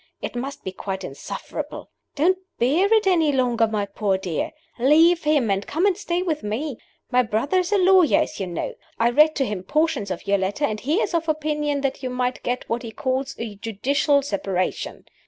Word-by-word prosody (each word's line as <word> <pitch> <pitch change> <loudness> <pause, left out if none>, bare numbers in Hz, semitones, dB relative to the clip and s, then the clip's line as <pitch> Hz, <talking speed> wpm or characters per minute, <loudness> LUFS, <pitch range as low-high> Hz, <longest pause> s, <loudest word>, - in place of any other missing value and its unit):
It - - -5
must 275 +4 -5
be 190 - -4
quite 190 0 -5
insufferable. 135 - -6 0.2
Don't 365 +6 +3 0.2
bear 320 - +2
it 440 -2 +4
any 335 -5 +3
longer, 245 -4 +2
my 210 -2 -1
poor 200 -1 -1
dear. 180 -4 -2 0.3
Leave 320 +6 +5
him, 290 -8 +3
and 195 +1 -1
come 335 +6 0
and 400 -3 +3
stay 355 -2 -2
with 315 -4 -1
me. 235 +6 -3 0.3
My 250 0 +5
brother 235 - +1
is 365 +1 -2
a 415 - +4
lawyer, 370 -4 +5
as - - -4
you 190 - -2
know. 170 -2 -4 0.2
I 235 +1 +3
read 305 +5 +5
to 270 - +1
him 205 -5 -3
portions 295 - 0
of 185 -2 -5
your 200 0 +2
letter, 200 +10 0
and 215 -5 -2
he 290 +8 0
is - - -1
of 330 -1 0
opinion 300 -2 0
that 275 -1 -2
you 255 - -3
might 250 0 -2
get 250 +1 -3
what 235 +1 -1
he 230 - -7
calls 260 +3 -2
a 230 -2 -5
judicial 275 +7 +1
separation. 195 -6 -2
265 Hz, 205 wpm, -23 LUFS, 215-310 Hz, 0.3 s, Leave